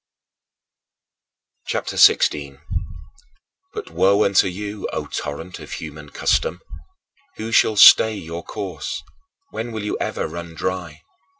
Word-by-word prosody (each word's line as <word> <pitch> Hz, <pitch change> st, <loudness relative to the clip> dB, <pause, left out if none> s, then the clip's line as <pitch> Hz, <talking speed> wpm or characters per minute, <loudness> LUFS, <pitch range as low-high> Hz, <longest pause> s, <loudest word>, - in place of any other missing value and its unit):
CHAPTER -, -, -3 dB
XVI -, -, +7 dB
25. 70 Hz, -2 st, -8 dB, 1.1 s
But 430 Hz, -, -7 dB
woe 100 Hz, +2 st, +3 dB
unto 100 Hz, -1 st, +4 dB
you, 100 Hz, +3 st, -5 dB
O -, -, -3 dB
torrent 80 Hz, +5 st, -6 dB
of -, -, -9 dB
human 75 Hz, -1 st, -8 dB
custom! 85 Hz, +4 st, 0 dB, 0.8 s
Who 110 Hz, +1 st, -6 dB
shall 110 Hz, -1 st, +4 dB
stay 110 Hz, +2 st, +8 dB
your 85 Hz, -3 st, -7 dB
course? 95 Hz, -9 st, -5 dB, 0.5 s
When 115 Hz, +2 st, -5 dB
will 110 Hz, -2 st, -5 dB
you 105 Hz, -, -3 dB
ever -, -, -2 dB
run 85 Hz, -1 st, -8 dB
dry? 90 Hz, 0 st, -4 dB
95 Hz, 120 wpm, -21 LUFS, 80-105 Hz, 1.1 s, stay